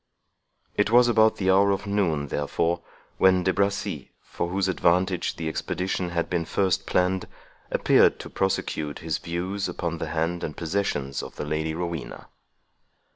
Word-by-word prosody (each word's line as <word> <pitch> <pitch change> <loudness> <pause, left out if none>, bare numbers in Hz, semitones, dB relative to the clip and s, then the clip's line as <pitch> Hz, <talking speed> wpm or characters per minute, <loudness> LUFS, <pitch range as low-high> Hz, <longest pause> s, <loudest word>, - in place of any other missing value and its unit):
It 105 0 +1
was 120 +2 +6
about 110 -2 +4
the 95 -1 +1
hour 100 +1 +5
of 100 0 0
noon, 85 -8 0
therefore, 85 +5 0 0.4
when 95 -1 +5
De 95 +1 +2
Bracy, 100 0 -1
for 85 - -4
whose 95 +1 0
advantage 90 0 +1
the 80 - -4
expedition 90 +2 -2
had 85 -1 -1
been 85 -2 -1
first 95 +2 0
planned, 90 0 +1 0.4
appeared - - +4
to - - -8
prosecute 80 -6 -1
his 80 -3 -1
views 95 +4 -3
upon 85 -2 -3
the - - -3
hand 85 +2 -1
and 75 - -5
possessions 80 -6 -2
of - - -9
the - - -4
Lady 80 +1 -2
Rowena. 85 -3 -5
90 Hz, 155 wpm, -25 LUFS, 80-95 Hz, 0.4 s, was